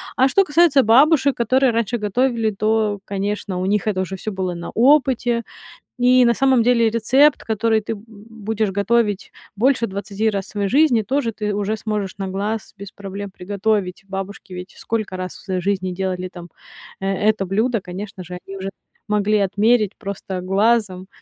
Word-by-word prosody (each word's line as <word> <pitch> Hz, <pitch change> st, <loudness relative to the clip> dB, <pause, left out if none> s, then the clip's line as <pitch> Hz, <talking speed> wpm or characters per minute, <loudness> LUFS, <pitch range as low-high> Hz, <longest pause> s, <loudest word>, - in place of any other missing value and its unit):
А 260 Hz, -, +4 dB
что 390 Hz, +8 st, +4 dB
касается 295 Hz, -4 st, +4 dB
бабушек, 275 Hz, +4 st, +5 dB
которые 255 Hz, +2 st, +2 dB
раньше 230 Hz, +1 st, -1 dB
готовили, 225 Hz, +1 st, 0 dB
то, 215 Hz, 0 st, 0 dB
конечно, 200 Hz, -1 st, -3 dB
у 185 Hz, -, -2 dB
них 210 Hz, +2 st, 0 dB
это 190 Hz, -3 st, 0 dB
уже 190 Hz, +1 st, -4 dB
всё 215 Hz, +3 st, -5 dB
было 185 Hz, -2 st, -3 dB
на 170 Hz, 0 st, -7 dB
опыте. 245 Hz, -2 st, +3 dB, 0.6 s
И 250 Hz, 0 st, +5 dB
на 235 Hz, -, +4 dB
самом 260 Hz, -1 st, +3 dB
деле 235 Hz, -1 st, +3 dB
рецепт, 260 Hz, +6 st, +3 dB
который 220 Hz, 0 st, +1 dB
ты 225 Hz, +2 st, -4 dB
б 205 Hz, -, -13 dB
будешь 220 Hz, -1 st, -4 dB
готовить 205 Hz, 0 st, 0 dB, 0.2 s
больше 245 Hz, +2 st, +2 dB
20 200 Hz, +2 st, -2 dB
раз 195 Hz, -2 st, -3 dB
в -, -, -15 dB
своей 200 Hz, -1 st, -2 dB
жизни, 265 Hz, -2 st, +4 dB
тоже 240 Hz, +2 st, -1 dB
ты 210 Hz, -1 st, -3 dB
уже 205 Hz, +2 st, -1 dB
сможешь 210 Hz, -3 st, -3 dB
на 195 Hz, -, -3 dB
глаз 205 Hz, +3 st, -3 dB
без 200 Hz, 0 st, -9 dB
проблем 200 Hz, 0 st, -7 dB
приготовить. 200 Hz, 0 st, -2 dB
Бабушки 195 Hz, 0 st, -6 dB
ведь 180 Hz, +1 st, -8 dB
сколько 215 Hz, -4 st, -3 dB
раз 185 Hz, 0 st, -4 dB
в -, -, -14 dB
своей 185 Hz, -2 st, -2 dB
жизни 185 Hz, -1 st, -1 dB
делали 185 Hz, 0 st, -3 dB
там, 175 Hz, -2 st, -11 dB, 0.5 s
э, 195 Hz, -, -3 dB, 0.2 s
это 205 Hz, -3 st, 0 dB
блюдо, 220 Hz, +5 st, 0 dB
конечно 185 Hz, +1 st, -7 dB
же, 180 Hz, +1 st, -7 dB
они 195 Hz, 0 st, -8 dB
уже 190 Hz, +1 st, -4 dB, 0.4 s
могли 210 Hz, 0 st, +2 dB
отмерить 210 Hz, +2 st, +2 dB
просто 190 Hz, -2 st, -5 dB
глазом. 195 Hz, -1 st, +1 dB
210 Hz, 175 wpm, -20 LUFS, 195-235 Hz, 0.6 s, бабушек